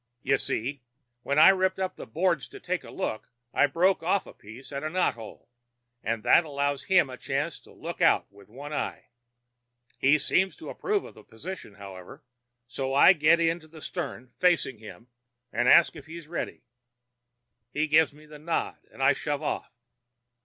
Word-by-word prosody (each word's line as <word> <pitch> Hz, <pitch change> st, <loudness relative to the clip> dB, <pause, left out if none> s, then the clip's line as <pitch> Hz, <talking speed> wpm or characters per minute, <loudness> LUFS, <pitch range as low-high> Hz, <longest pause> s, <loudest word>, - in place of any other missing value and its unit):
You 135 Hz, 0 st, +2 dB
see, 135 Hz, +4 st, -2 dB, 0.4 s
when 140 Hz, +3 st, -1 dB
I 155 Hz, -, +9 dB
ripped 190 Hz, 0 st, +2 dB
up 190 Hz, -1 st, -2 dB
the -, -, -9 dB
boards 165 Hz, -, 0 dB
to -, -, -12 dB
take -, -, -3 dB
a -, -, -11 dB
look 110 Hz, -, -4 dB, 0.2 s
I 145 Hz, -, +4 dB
broke 180 Hz, +7 st, +2 dB
off 185 Hz, +4 st, +1 dB
a -, -, -12 dB
piece 115 Hz, +7 st, -13 dB
at 140 Hz, +1 st, -4 dB
a 155 Hz, -, -2 dB
knot 180 Hz, +2 st, +1 dB
hole, 115 Hz, -2 st, -12 dB, 0.5 s
and 110 Hz, 0 st, -2 dB
that -, -, +6 dB
allows 140 Hz, -2 st, -2 dB
him 185 Hz, -6 st, +4 dB
a 130 Hz, -1 st, -9 dB
chance 140 Hz, +4 st, -3 dB
to -, -, -19 dB
look -, -, -7 dB
out -, -, +4 dB
with 100 Hz, 0 st, -18 dB
one 140 Hz, +6 st, -8 dB
eye. -, -, -4 dB, 0.9 s
He 140 Hz, +3 st, +5 dB
seems 185 Hz, +6 st, +1 dB
to 325 Hz, -, -9 dB
approve 410 Hz, -1 st, -1 dB
of -, -, -11 dB
the 110 Hz, -, -16 dB
position, 140 Hz, -, -9 dB
however, 95 Hz, -3 st, -11 dB, 0.4 s
so 135 Hz, +2 st, -3 dB
I 145 Hz, +7 st, +8 dB
get 160 Hz, 0 st, +4 dB
in 165 Hz, +1 st, +1 dB
at 155 Hz, -, -17 dB
the 160 Hz, 0 st, -13 dB
stern, 130 Hz, -4 st, -6 dB
facing 170 Hz, -10 st, +2 dB
him, 110 Hz, 0 st, -12 dB, 0.5 s
and 120 Hz, +1 st, +1 dB
ask 170 Hz, -, +6 dB
if -, -, -11 dB
he's 165 Hz, -1 st, -9 dB
ready. 170 Hz, -6 st, -5 dB, 1.1 s
He 150 Hz, +5 st, 0 dB
gives 155 Hz, +1 st, +4 dB
me 150 Hz, +2 st, -17 dB
the 150 Hz, -1 st, -12 dB
nod, 165 Hz, +2 st, -2 dB
and 135 Hz, -, -5 dB
I -, -, +6 dB
shove 145 Hz, -1 st, -3 dB
off. -, -, -3 dB
145 Hz, 190 wpm, -27 LUFS, 130-170 Hz, 1.1 s, I